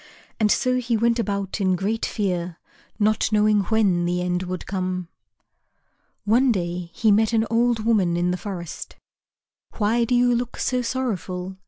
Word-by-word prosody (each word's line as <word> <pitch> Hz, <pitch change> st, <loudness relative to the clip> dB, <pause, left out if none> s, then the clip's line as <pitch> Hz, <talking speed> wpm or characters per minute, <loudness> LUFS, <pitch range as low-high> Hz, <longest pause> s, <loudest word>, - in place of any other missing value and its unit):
And 210 Hz, -2 st, +3 dB
so 255 Hz, -1 st, +2 dB
he 240 Hz, -2 st, 0 dB
went 235 Hz, +1 st, +2 dB
about 200 Hz, -2 st, -2 dB
in 185 Hz, -1 st, +2 dB
great 205 Hz, +5 st, -1 dB
fear, 180 Hz, -5 st, -2 dB, 0.4 s
not 215 Hz, +1 st, +1 dB
knowing 210 Hz, 0 st, +3 dB
when 195 Hz, -5 st, +2 dB
the 175 Hz, +1 st, 0 dB
end 180 Hz, 0 st, -1 dB
would 185 Hz, -1 st, -5 dB
come. 185 Hz, -2 st, -3 dB, 1.2 s
One 240 Hz, +5 st, +4 dB
day 175 Hz, -3 st, -3 dB
he 215 Hz, +5 st, +2 dB
met 220 Hz, +2 st, +3 dB
an 225 Hz, 0 st, +2 dB
old 230 Hz, -1 st, +1 dB
woman 190 Hz, -7 st, +2 dB
in 175 Hz, +1 st, +1 dB
the -, -, 0 dB
forest. 180 Hz, -4 st, -7 dB, 0.8 s
"Why 225 Hz, +3 st, +2 dB
do 245 Hz, -, +1 dB
you 245 Hz, 0 st, +4 dB
look 240 Hz, 0 st, -2 dB
so 250 Hz, -1 st, 0 dB
sorrowful?" 190 Hz, -7 st, -3 dB
210 Hz, 160 wpm, -23 LUFS, 180-230 Hz, 1.2 s, One